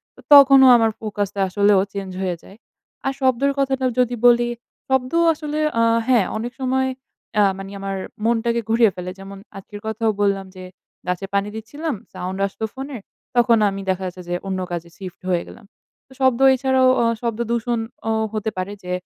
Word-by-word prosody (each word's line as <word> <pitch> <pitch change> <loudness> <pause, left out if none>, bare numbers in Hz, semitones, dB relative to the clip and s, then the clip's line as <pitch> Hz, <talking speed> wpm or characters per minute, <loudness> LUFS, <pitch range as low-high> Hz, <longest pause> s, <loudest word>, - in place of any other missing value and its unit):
তো - - -21
তখনও 275 -2 +9
আমার 225 -1 +2
ফোকাস 210 -2 -2
টা 200 - -1
আসলেও 200 0 +3
চেঞ্জ 195 -1 -5
হয়ে 185 -2 -1
যায়। 195 - -15 0.5
আর 270 - 0
শব্দের 260 +1 +2
কথাটা 265 -1 0
যদি 245 -1 +2
বলি, 240 0 +4 0.4
শব্দ 265 -1 +1 0.2
আসলে 300 -1 -4 0.2
আ - - +4 0.2
হ্যাঁ 240 -7 +4
অনেক 235 +3 -4
সময় 260 0 +1 0.5
অ্যা 210 -1 +5
মানে 195 0 -8
আমার 195 0 -4 0.3
মনটাকে 235 0 +1
ঘুরিয়ে 225 -2 +4
ফেলে। 180 0 -6
যেমন 195 +1 -9 0.2
আজকের 205 +1 -10
কথাও 220 0 0
বললাম 200 -1 +1
যে 185 - -9 0.4
গাছে 180 +1 -2
পানি 200 +1 0
দিচ্ছিলাম, 290 +7 -4 0.2
সাউন্ড 185 +1 -5
আসতো 220 +3 -5
ফোনের। 270 -4 -7 0.3
তখন 240 -1 +4
আমি 195 0 -5
দেখা 190 0 -1
যাচ্ছে 180 0 -8
যে 175 - -1
অন্য 190 -1 -2
কাজে 170 -1 -5
শিফট 185 -2 -9
হয়ে 175 -1 +1
গেলাম। 210 - -14 0.4
তো - - -31
শব্দ 260 -2 +3 0.2
এছাড়াও 260 0 +3
অ - - +3 0.2
শব্দ 235 -1 -3
দূষণ 235 0 -1 0.3
ও - - +2 0.2
হতে 215 0 -2
পারে 185 +2 -3
যে, 180 - -6
225 Hz, 180 wpm, -21 LUFS, 195-255 Hz, 0.5 s, তখনও